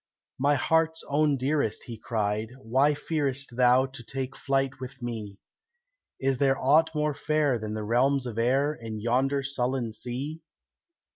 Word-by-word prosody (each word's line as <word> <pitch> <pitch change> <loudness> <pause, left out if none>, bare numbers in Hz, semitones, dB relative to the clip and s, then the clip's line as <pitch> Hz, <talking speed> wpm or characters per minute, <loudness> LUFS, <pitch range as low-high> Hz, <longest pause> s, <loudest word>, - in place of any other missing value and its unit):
"My 145 +2 +3
heart's 160 +2 +1
own 145 0 +2
dearest," 135 -3 0
he 120 - -7
cried, 110 -1 -1
"why 135 +4 +2
fearest 140 -4 -2
Thou 125 +1 +5
to 135 -1 -9
take 135 +2 -5
flight 135 -1 -1
with 130 +1 -8
me? 110 -5 -5 0.8
Is 135 -1 0
there 135 -1 +3
aught 155 +5 +4
more 150 0 +1
fair 145 -4 +1
than 110 0 -4
the 110 - -3
realms 130 +5 +2
of 115 -2 -4
air 135 +5 +2
In 115 -5 -7
yonder 130 +5 +1
sullen 130 -3 -1
sea? 135 +8 -5
135 Hz, 150 wpm, -27 LUFS, 120-140 Hz, 0.8 s, Thou